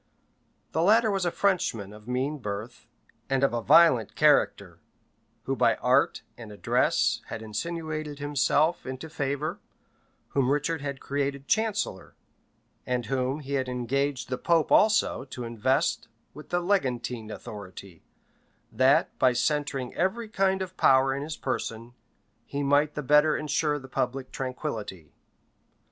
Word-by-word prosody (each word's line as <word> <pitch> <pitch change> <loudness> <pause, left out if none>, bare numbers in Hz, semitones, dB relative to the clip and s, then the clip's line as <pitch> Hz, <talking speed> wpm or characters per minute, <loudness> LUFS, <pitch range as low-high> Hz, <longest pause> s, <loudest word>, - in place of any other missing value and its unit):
The 160 - 0
latter 220 +4 +4
was 195 -3 0
a - - 0
Frenchman 115 - 0
of 105 +1 -14
mean 135 +4 -2
birth, 105 +1 -6 0.4
and 135 0 +1
of 140 - +3
a 120 - -1
violent 145 -6 +5
character; - - +2 0.6
who - - -2
by - - +3
art - - +2 0.2
and 115 -3 -9
address 105 - +1
had 110 - -6
insinuated 155 +5 -4
himself 145 +3 +1
into 130 +4 -6
favor, 150 +5 -2 0.7
whom 135 -2 +1
Richard 150 +3 0
had 140 -2 -5
created 140 0 -3
chancellor, 210 - -1 0.7
and 125 -1 -2
whom 130 +4 -1
he 140 0 -6
had 130 -2 0
engaged 130 +2 -2
the 125 - -3
pope 165 -2 +2
also 215 -9 +4
to 130 -2 -7
invest 125 +6 0 0.3
with 150 - -12
the 175 - 0
legantine 125 - -1
authority, 100 -5 -10 0.7
that, 135 +5 +3
by 130 -1 +4
centring 135 0 -1
every 215 +5 -1
kind 190 -2 +1
of 185 0 -10
power 135 0 +4
in 140 - -3
his 155 +2 -5
person, 115 -2 -4 0.5
he 140 +4 -4
might 145 +2 +2
the 150 - -3
better 150 +3 +4
insure 150 0 0
the 135 -2 -10
public 130 0 -3
tranquillity. 110 - -5
140 Hz, 140 wpm, -27 LUFS, 125-155 Hz, 0.7 s, violent